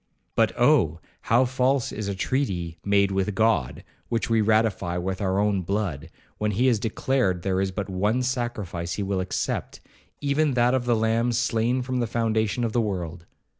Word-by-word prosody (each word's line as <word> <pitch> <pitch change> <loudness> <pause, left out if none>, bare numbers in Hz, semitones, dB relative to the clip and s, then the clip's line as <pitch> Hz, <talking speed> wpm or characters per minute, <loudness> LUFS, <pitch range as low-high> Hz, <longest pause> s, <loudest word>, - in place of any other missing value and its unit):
But - - +3
Oh! - - +3 0.3
how 120 +3 +5
false 130 +1 +1
is 105 -1 -4
a 100 - -2
treaty 90 - -2
made 100 -1 +3
with 95 +1 -1
God, 110 - +1 0.3
which 115 0 -1
we 115 -1 +4
ratify 110 -5 +1
with 95 +3 -3
our 95 -1 0
own 100 -1 +1
blood, 85 -5 -3 0.3
when 105 - 0
he 120 +7 +1
has 120 -5 +3
declared 110 -4 0
there 95 -1 0
is 95 - 0
but 95 +1 -4
one 105 +6 0
sacrifice 110 -9 -3
he 100 - -2
will 95 -1 -1
accept, 95 0 -3 0.4
even 145 0 +1
that 120 +1 +3
of 130 -2 0
the 120 -1 +3
Lamb 115 +2 +1
slain 120 +1 +1
from 130 0 -2
the 120 - 0
foundation 110 0 0
of 115 -2 -1
the 120 - +2
world! 90 -5 -4
110 Hz, 180 wpm, -25 LUFS, 95-120 Hz, 0.4 s, how